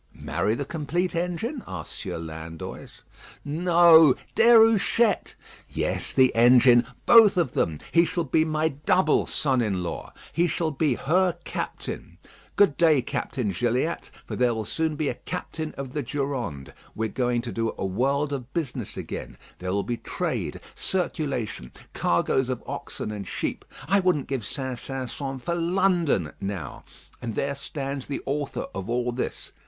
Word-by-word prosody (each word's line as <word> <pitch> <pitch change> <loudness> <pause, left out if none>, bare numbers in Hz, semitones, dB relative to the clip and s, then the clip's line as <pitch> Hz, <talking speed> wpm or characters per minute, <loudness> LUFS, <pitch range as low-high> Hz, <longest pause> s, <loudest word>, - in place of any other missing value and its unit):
"Marry 95 +7 -1
the 140 - -3
complete 170 +5 -2
engine?" 180 - -2
asked 90 -4 -6
Sieur - - -5
Landoys. 80 0 -8 0.4
"No; 165 -1 +6 0.2
Déruchette; 225 -1 +4 0.3
yes; - - -2
the 130 -1 +4
engine. 120 0 +6 0.2
Both 225 -5 +7
of 170 -8 +2
them. 80 -9 0
He 170 - +5
shall 170 0 -1
be 155 +2 +2
my 155 0 +1
double 160 +3 +2
son 135 -4 +1
in 100 -5 -1
law. 85 - -5 0.2
He 170 +1 +3
shall 165 -1 -1
be 140 -2 +1
her 180 +7 +2
captain. - - -5 0.4
Good 200 -8 +4
day, 155 -6 +4
Captain 120 -3 -2
Gilliatt; 120 - -1 0.2
for - - -5
there 120 -2 +2
will 110 -1 -3
soon 160 +6 -1
be 150 -1 -1
a - - 0
captain 155 -1 -5
of 135 -2 -5
the 150 - -1
Durande. 130 - -4 0.2
We 110 - -1
are - - -2
going 120 -1 0
to 120 - -5
do 115 +2 -1
a - - -2
world 140 +9 0
of 130 -2 -5
business 160 -7 -3
again. - - -6 0.2
There 90 0 -3
will 100 +1 0
be 120 -1 -3
trade, - - -3
circulation, 140 - -2 0.2
cargoes 125 +9 +1
of 130 - -3
oxen 105 - -5
and 100 -3 -6
sheep. - - -3 0.2
I 200 +3 +4
wouldn't 180 -7 +1
give 135 -5 -3
St. 130 +2 -4
Sampson 135 +1 -4
for 150 +7 -3
London 170 - +1
now. 95 -8 -5 0.4
And 115 -3 -4
there 140 +5 0
stands 140 -1 -5
the 140 - -4
author 140 0 -2
of 95 +2 -5
all 125 0 0
this. 120 - -4
135 Hz, 160 wpm, -26 LUFS, 115-165 Hz, 0.4 s, Both